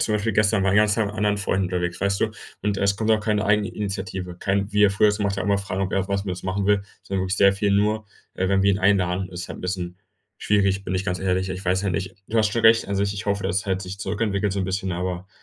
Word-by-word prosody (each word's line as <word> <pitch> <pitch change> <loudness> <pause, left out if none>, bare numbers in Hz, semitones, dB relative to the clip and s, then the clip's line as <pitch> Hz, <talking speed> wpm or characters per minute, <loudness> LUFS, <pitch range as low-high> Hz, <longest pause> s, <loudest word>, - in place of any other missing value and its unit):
zum 110 - +1
Beispiel 105 +2 0
gestern, 105 -1 +3
war 95 - +3
den 100 - +4
ganzen 105 0 +4
Tag 110 -2 +1
mit 100 - -6
anderen 105 -1 +1
Freunden 95 -1 0
unterwegs, 90 -1 -2
weißt 100 0 +1
du? 110 - +1 0.3
Und 105 -1 0
es 100 0 +2
kommt 110 +1 0
auch 110 - +4
keine 105 -1 0
Eigeninitiative, 100 -3 -2
kein 100 +1 -1
wie 105 0 +5
er 100 - +5
früher 105 +2 +4
es 105 0 0
gemacht 100 -1 -1
hat, 95 - -2
immer 100 -1 +2
fragen, 95 -1 -3
ob 95 - -2
er 95 - +2
auch 95 - -5
was 100 0 -1
mit 95 - -3
uns 90 - -7
machen 95 +1 -2
will, 105 0 +3 0.2
sondern 95 -1 -2
wirklich 95 +2 -1
sehr 100 0 +5
viel 100 +1 0
nur, 105 +2 +1 0.3
äh, 95 0 0
wenn 95 0 +2
wir 100 - +4
ihn 95 - +1
einladen. 95 -2 +1
Ist 90 0 -7
halt - - -7
'n - - -9
bisschen 90 -1 -4 0.4
schwierig, 100 -2 +1
bin 95 - -4
ich 95 +1 -1
ganz 90 -2 -2
ehrlich. 95 0 0
Ich 95 +1 -5
weiß 95 +1 +1
ja 100 - 0
nicht 90 +2 -3
du 115 - 0
hast 110 -1 +3
schon 115 0 0
recht 115 -1 +5
an 100 - -1
sich. 100 0 0
Ich 105 - -6
hoffe, 100 -1 0
dass 95 +3 0
er - - -17
halt 95 0 -2
sich 95 +1 -7
zurückentwickelt, 100 +1 -1
so 100 - -1
'n - - -1
bisschen, 95 0 -2
aber, 90 +1 -4
100 Hz, 295 wpm, -23 LUFS, 95-105 Hz, 0.4 s, wie